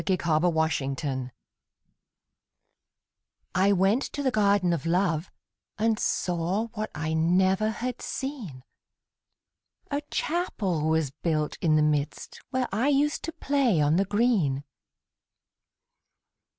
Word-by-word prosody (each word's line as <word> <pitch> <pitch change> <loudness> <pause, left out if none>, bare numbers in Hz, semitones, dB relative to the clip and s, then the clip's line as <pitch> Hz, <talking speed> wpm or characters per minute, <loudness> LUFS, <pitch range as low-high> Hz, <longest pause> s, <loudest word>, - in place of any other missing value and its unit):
THE 190 -2 +1
GARDEN 165 0 +1
OF 165 - -3
LOVE 140 -4 -1 2.2
I 190 +2 +3
went 195 +6 +3
to 285 - -4
the 260 - +2
Garden 200 -5 +3
of 165 -1 -3
Love, 175 -1 +1 0.5
And 220 0 +1
saw 180 +6 -1
what 215 -1 -4
I 155 +1 -2
never 185 +6 +2
had 245 +3 -4
seen; 235 - -5 1.3
A 285 +1 0
Chapel 195 - -1
was 160 -4 +1
built 155 0 -1
in 155 -3 +3
the 155 - +4
midst, 150 -1 -2
Where 260 -1 -1
I 225 +7 +1
used 290 +1 +2
to 330 - -4
play 275 - +1
on 150 +2 +3
the 195 - +2
green. 200 - +1
185 Hz, 120 wpm, -27 LUFS, 160-225 Hz, 2.2 s, the